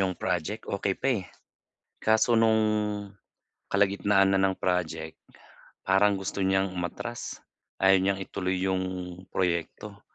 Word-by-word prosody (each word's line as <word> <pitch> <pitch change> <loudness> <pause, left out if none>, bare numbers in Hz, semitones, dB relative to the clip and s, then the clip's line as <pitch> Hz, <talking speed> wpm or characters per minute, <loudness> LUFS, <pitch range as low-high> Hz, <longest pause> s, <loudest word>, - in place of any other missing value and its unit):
'yong 95 -2 0
project, 95 +6 -2
okey 100 -1 -2
pa, 135 - -1
eh. 90 - -12 0.8
Kaso 110 +2 +4
no'ng, 110 -1 +4 1.1
kalagitnaan 100 0 +3
na 95 - +3
ng 95 -1 +1
project, 85 -3 -2 0.6
parang 100 +1 +4
gusto 95 +1 -4
niyang 95 0 +1
umatras. 90 -1 -5 0.4
Ayaw 95 0 +5
niyang 95 0 +1
ituloy 95 -1 -2
'yong, 95 -1 0 0.5
proyekto. 95 +3 -2
95 Hz, 120 wpm, -27 LUFS, 95-100 Hz, 1.1 s, Ayaw